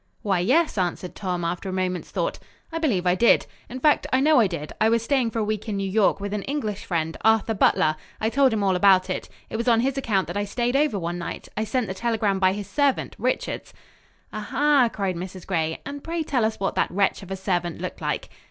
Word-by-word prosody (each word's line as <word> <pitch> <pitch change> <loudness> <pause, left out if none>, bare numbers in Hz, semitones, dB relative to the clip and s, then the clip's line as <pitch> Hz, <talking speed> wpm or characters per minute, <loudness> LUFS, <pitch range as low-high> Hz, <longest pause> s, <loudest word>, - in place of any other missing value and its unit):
"Why, 195 -4 +1
yes," 265 - +2
answered 180 0 -2
Tom 180 -3 -3
after 175 +3 -3
a - - -3
moment's 185 -1 -2
thought. - - -2 0.3
"I 330 - -2
believe 225 - +1
I 180 - +4
did. 230 +6 +4 0.2
In 255 - -6
fact 300 +3 +3
I 260 - +3
know 300 0 +5
I 220 - +5
did. 160 -4 -6
I 220 - +5
was 230 0 +2
staying 260 -2 +1
for 225 - -6
a 220 - +1
week 215 +1 -3
in 205 - -2
New 195 0 -1
York, 200 +1 +2
with 200 0 -4
an 210 - -1
English 215 -6 -3
friend, 165 -2 -1
Arthur 220 0 +3
Butler. 155 -6 +3 0.2
I 220 +1 0
told 275 -1 +4
him 215 -2 0
all 190 -2 +2
about 185 0 +4
it. - - -4 0.2
It - - -2
was 235 +2 -3
on 230 -1 +5
his 270 +2 0
account 200 -7 +1
that - - -5
I 205 - 0
stayed 240 +5 -1
over 290 -6 +2
one 175 -1 -3
night. 170 - -6
I 215 - -1
sent 245 +2 0
the 190 - -4
telegram 215 -2 0
by 185 -1 +3
his 205 0 -5
servant, 280 +5 0
Richards." 255 +1 -2 0.6
"Ah, 215 - -3
ha!" 285 -4 +4
cried 195 -3 -2
Mrs. 185 +1 -7
Gray. 160 -4 -1
"And 285 0 -7
pray 330 0 -2
tell 255 -7 +1
us 220 - -2
what 195 - -1
that - - +1
wretch 195 +2 +1
of 190 - -11
a 195 - -3
servant 175 -3 -2
looked - - -6
like." - - -2
205 Hz, 245 wpm, -24 LUFS, 185-245 Hz, 0.6 s, know